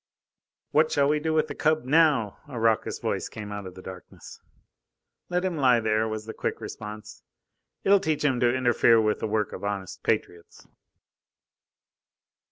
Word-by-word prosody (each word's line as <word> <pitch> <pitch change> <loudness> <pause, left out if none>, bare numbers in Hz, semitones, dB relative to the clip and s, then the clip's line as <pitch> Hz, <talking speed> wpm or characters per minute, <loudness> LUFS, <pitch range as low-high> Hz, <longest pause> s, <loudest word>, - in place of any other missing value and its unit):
"What 155 +1 +3
shall 140 -1 +3
we 150 +1 +2
do 160 +1 -2
with 155 -1 +2
the 145 - -5
cub 155 -1 +1
now?" 140 -7 +3
a 130 -5 -6
raucous 115 -1 +1
voice - - -3
came 105 -2 -8
out 105 -2 -6
of 90 - -11
the 95 - -11
darkness. 95 -1 -11 0.9
"Let 180 +1 0
him 180 -3 -2
lie 125 -4 +4
there," 110 0 +1
was 110 -1 -5
the 110 - -7
quick - - -3
response. 105 0 -8 0.6
"It'll 200 0 +5
teach 155 -4 -1
him 130 -4 +2
to 120 0 +3
interfere 120 -2 +4
with 110 -1 +1
the - - -2
work 105 -1 -1
of - - -8
honest 100 -2 -4
patriots." 85 -1 -3
115 Hz, 170 wpm, -26 LUFS, 105-150 Hz, 0.9 s, It'll